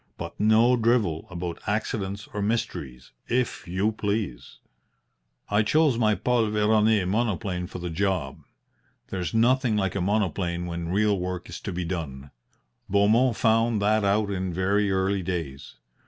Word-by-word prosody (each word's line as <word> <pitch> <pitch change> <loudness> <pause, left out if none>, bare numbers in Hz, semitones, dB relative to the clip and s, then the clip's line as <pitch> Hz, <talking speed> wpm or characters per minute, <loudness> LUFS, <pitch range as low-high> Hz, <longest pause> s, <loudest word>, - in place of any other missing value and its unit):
But - - -7
no 110 +4 +5
drivel 110 -9 +1
about 85 -1 -5
accidents 100 -2 -2
or 105 - -3
mysteries, 100 - -3 0.2
if 125 -5 -1
you 95 +5 0
please. 100 - -3 0.9
"I 105 +1 +2
chose 145 +5 +3
my 110 -2 +3
Paul 120 -1 +1
Veroner 105 -1 +3
monoplane 100 -4 -1
for 90 - -8
the 90 -1 -5
job. 90 -6 -1 0.7
There's 95 +3 -3
nothing 120 0 +3
like 95 -2 0
a 100 - -2
monoplane 90 -3 -1
when 85 -1 -4
real 100 +1 +2
work 90 0 -4
is - - -7
to 100 - -4
be 90 0 -3
done. 70 -6 -5 0.6
Beaumont 110 +5 +3
found 115 0 +2
that 110 +1 +2
out 100 +1 +1
in 95 -1 -2
very 100 +3 +1
early 95 +1 +1
days. 80 -6 -5
100 Hz, 145 wpm, -26 LUFS, 90-110 Hz, 0.9 s, no